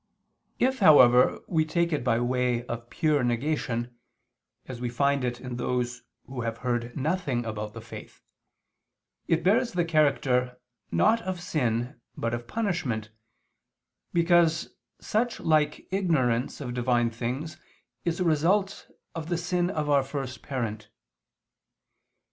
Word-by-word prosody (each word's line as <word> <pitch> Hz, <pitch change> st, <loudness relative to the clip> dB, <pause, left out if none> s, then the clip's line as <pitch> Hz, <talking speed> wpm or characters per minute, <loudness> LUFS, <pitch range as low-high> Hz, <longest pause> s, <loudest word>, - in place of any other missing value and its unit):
If, 260 Hz, +1 st, +1 dB
however, 130 Hz, -, +6 dB
we 160 Hz, -2 st, +1 dB
take 170 Hz, +1 st, 0 dB
it 145 Hz, -, -1 dB
by 115 Hz, -2 st, +2 dB
way 125 Hz, -1 st, 0 dB
of 120 Hz, 0 st, -6 dB
pure 150 Hz, -5 st, +1 dB
negation, 120 Hz, -1 st, -1 dB, 0.7 s
as 125 Hz, -2 st, -7 dB
we 125 Hz, -, -1 dB
find 140 Hz, +2 st, +1 dB
it 120 Hz, -1 st, -2 dB
in 125 Hz, -1 st, -6 dB
those 125 Hz, 0 st, -2 dB, 0.2 s
who 130 Hz, -1 st, -6 dB
have 115 Hz, -1 st, -3 dB
heard 120 Hz, +1 st, -1 dB
nothing 145 Hz, -5 st, -1 dB
about 105 Hz, -1 st, -5 dB
the 115 Hz, -, -8 dB
faith, 115 Hz, -, -11 dB, 1.0 s
it 165 Hz, 0 st, +1 dB
bears 230 Hz, +7 st, +3 dB
the 175 Hz, -1 st, +1 dB
character, 135 Hz, -6 st, +1 dB, 0.3 s
not 225 Hz, +1 st, +3 dB
of 185 Hz, -4 st, -4 dB
sin, 120 Hz, -8 st, -2 dB, 0.2 s
but 115 Hz, 0 st, -2 dB
of 120 Hz, 0 st, -4 dB
punishment, 140 Hz, -, -2 dB, 1.0 s
because 170 Hz, -1 st, +3 dB, 0.3 s
such 230 Hz, +2 st, -1 dB
like 155 Hz, -2 st, +1 dB
ignorance 140 Hz, -11 st, +1 dB
of 125 Hz, -3 st, -4 dB
Divine 120 Hz, -1 st, +1 dB
things 125 Hz, +7 st, -4 dB, 0.5 s
is 170 Hz, 0 st, -1 dB
a -, -, +2 dB
result 180 Hz, +5 st, +1 dB, 0.3 s
of 165 Hz, -1 st, -6 dB
the 175 Hz, -, 0 dB
sin 175 Hz, 0 st, 0 dB
of 155 Hz, -5 st, -2 dB
our 145 Hz, -1 st, +4 dB
first 135 Hz, -1 st, -5 dB
parent. 110 Hz, -5 st, -4 dB
135 Hz, 135 wpm, -27 LUFS, 120-170 Hz, 1.0 s, however